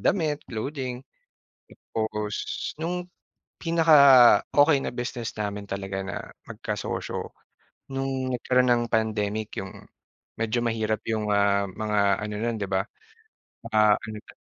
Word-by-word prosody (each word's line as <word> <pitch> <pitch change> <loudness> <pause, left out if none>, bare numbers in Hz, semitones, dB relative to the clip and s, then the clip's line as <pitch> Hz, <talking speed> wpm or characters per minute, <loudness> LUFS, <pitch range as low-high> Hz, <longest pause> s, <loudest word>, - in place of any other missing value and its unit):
damit, 155 -6 +1
clothing. 130 +2 -4 0.9
Tapos 105 -1 -2 0.4
no'ng 180 +2 -3 0.5
pinaka-okey 145 -3 +6
na - - -2
business 120 -1 -4
namin 105 -1 -4
talaga 95 0 -4
na 95 - -5 0.3
magka-sosyo, - - -4 0.6
no'ng 135 -1 -2
nagkaroon 125 +1 +2
ng 120 -1 +3
pandemic. 110 -1 -1
'Yong 95 0 -7 0.5
medyo 115 +1 0
mahirap 110 -2 -1
'yong, 110 -1 -1
ah, 100 0 +3
mga 105 +2 -2 0.2
ano 105 0 -4
no'n 120 -1 -1
'di 100 - -2
ba, 95 0 +1 0.9
ah, 105 -1 +5
ano 110 -1 -7
'to? - - -17
110 Hz, 115 wpm, -26 LUFS, 105-130 Hz, 0.9 s, pinaka-okey